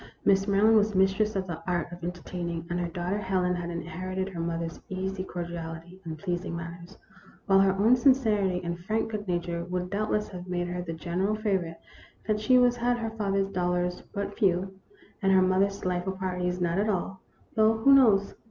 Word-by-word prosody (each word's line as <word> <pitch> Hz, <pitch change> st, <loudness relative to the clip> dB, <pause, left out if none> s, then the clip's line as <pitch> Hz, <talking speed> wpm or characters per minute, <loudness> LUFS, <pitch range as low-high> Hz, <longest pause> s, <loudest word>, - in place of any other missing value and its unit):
Mrs. 195 Hz, 0 st, +4 dB
Maryland 210 Hz, +3 st, +5 dB
was 210 Hz, -1 st, +2 dB
mistress 195 Hz, +3 st, +2 dB
of 190 Hz, -1 st, -1 dB
the 165 Hz, -3 st, -6 dB
art 175 Hz, -1 st, -1 dB
of 175 Hz, -1 st, -10 dB
enter 175 Hz, 0 st, -5 dB
taining, 170 Hz, -2 st, -4 dB
and 175 Hz, -, 0 dB
her 175 Hz, -, -1 dB
daughter 175 Hz, +4 st, -2 dB
Helen 185 Hz, -2 st, 0 dB
had 175 Hz, -1 st, -3 dB
inherited 185 Hz, +2 st, -4 dB
her 180 Hz, -3 st, -7 dB
mother's 165 Hz, 0 st, -3 dB
easy 190 Hz, 0 st, -3 dB
cordiality 170 Hz, 0 st, -7 dB
and 160 Hz, -2 st, -6 dB
pleasing 175 Hz, 0 st, -3 dB
manners, 170 Hz, +2 st, -8 dB, 0.5 s
while 195 Hz, -1 st, +5 dB
her 195 Hz, -1 st, +4 dB
own 215 Hz, +6 st, +4 dB
sincerity 220 Hz, -8 st, +3 dB
and 170 Hz, 0 st, -3 dB
frank 220 Hz, +1 st, -1 dB
good 210 Hz, -2 st, -4 dB
nature 175 Hz, -1 st, -2 dB
would 180 Hz, +1 st, -3 dB
doubtless 210 Hz, +1 st, 0 dB
have 180 Hz, -1 st, -8 dB
made 175 Hz, -1 st, -2 dB
her 180 Hz, 0 st, -3 dB
the 170 Hz, -2 st, -5 dB
general 175 Hz, +6 st, -1 dB
favor 200 Hz, -5 st, 0 dB
ite 165 Hz, 0 st, -9 dB, 0.5 s
that 215 Hz, -1 st, 0 dB
she 255 Hz, +4 st, +5 dB
was 245 Hz, -1 st, +4 dB
had 240 Hz, 0 st, +1 dB
her 225 Hz, -1 st, -3 dB
father's 195 Hz, -3 st, 0 dB
dollars 180 Hz, -1 st, 0 dB
been -, -, -24 dB
but 200 Hz, -1 st, -4 dB
few 190 Hz, -2 st, +2 dB, 0.5 s
and 195 Hz, -1 st, +3 dB
her 190 Hz, -, +6 dB
mother's 195 Hz, +2 st, +2 dB
delightful 180 Hz, +1 st, -1 dB
parties 180 Hz, -1 st, -2 dB
not 175 Hz, +1 st, 0 dB
at 210 Hz, +2 st, +1 dB
all; 190 Hz, -1 st, -2 dB, 0.3 s
though 220 Hz, 0 st, +4 dB
who 275 Hz, +5 st, +5 dB
knows 215 Hz, -7 st, +5 dB
185 Hz, 200 wpm, -28 LUFS, 175-205 Hz, 0.5 s, her